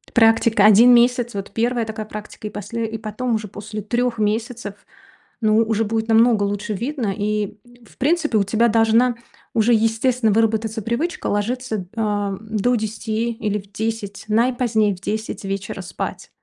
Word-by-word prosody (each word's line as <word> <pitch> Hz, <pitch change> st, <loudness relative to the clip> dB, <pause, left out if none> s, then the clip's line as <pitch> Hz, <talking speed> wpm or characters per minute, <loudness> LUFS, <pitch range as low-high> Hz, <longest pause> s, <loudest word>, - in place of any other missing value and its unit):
Практика 225 Hz, -2 st, +4 dB
1 220 Hz, +4 st, +8 dB
месяц, 240 Hz, 0 st, +3 dB
вот 200 Hz, -1 st, -5 dB
1 235 Hz, +2 st, 0 dB
такая 220 Hz, 0 st, -5 dB
практика, 210 Hz, 0 st, -8 dB
и -, -, -5 dB
после 210 Hz, +3 st, -4 dB
и 225 Hz, -, -4 dB
потом 225 Hz, +3 st, -2 dB
уже 215 Hz, -2 st, -4 dB
после 210 Hz, +2 st, -7 dB
3 240 Hz, +3 st, -1 dB
месяцев, 220 Hz, 0 st, -2 dB, 0.7 s
ну, 215 Hz, -1 st, +3 dB
уже 225 Hz, -1 st, +2 dB
будет 225 Hz, +1 st, -2 dB
намного 225 Hz, -1 st, +4 dB
лучше 205 Hz, +1 st, -2 dB
видно, 235 Hz, 0 st, -2 dB
и, 210 Hz, 0 st, -2 dB, 0.3 s
в -, -, -21 dB
принципе, 305 Hz, -3 st, +1 dB
у 205 Hz, -, +3 dB
тебя 225 Hz, +4 st, +2 dB
должна 225 Hz, +2 st, +3 dB, 0.4 s
уже 230 Hz, +1 st, +3 dB
естественно 225 Hz, +1 st, +2 dB
выработаться 220 Hz, +1 st, +1 dB
привычка 235 Hz, -, -2 dB
ложиться, 220 Hz, -1 st, -2 dB
ам 205 Hz, -3 st, -1 dB
до 220 Hz, +3 st, 0 dB
10 220 Hz, +1 st, -2 dB
или 210 Hz, -2 st, -2 dB
в 195 Hz, 0 st, -15 dB
10, 220 Hz, -2 st, -4 dB
наипозднее, 225 Hz, -2 st, +2 dB
в 180 Hz, -, -17 dB
10 215 Hz, +2 st, -4 dB
вечера 195 Hz, +1 st, -4 dB
спать. -, -, -6 dB
220 Hz, 155 wpm, -21 LUFS, 210-235 Hz, 0.7 s, 1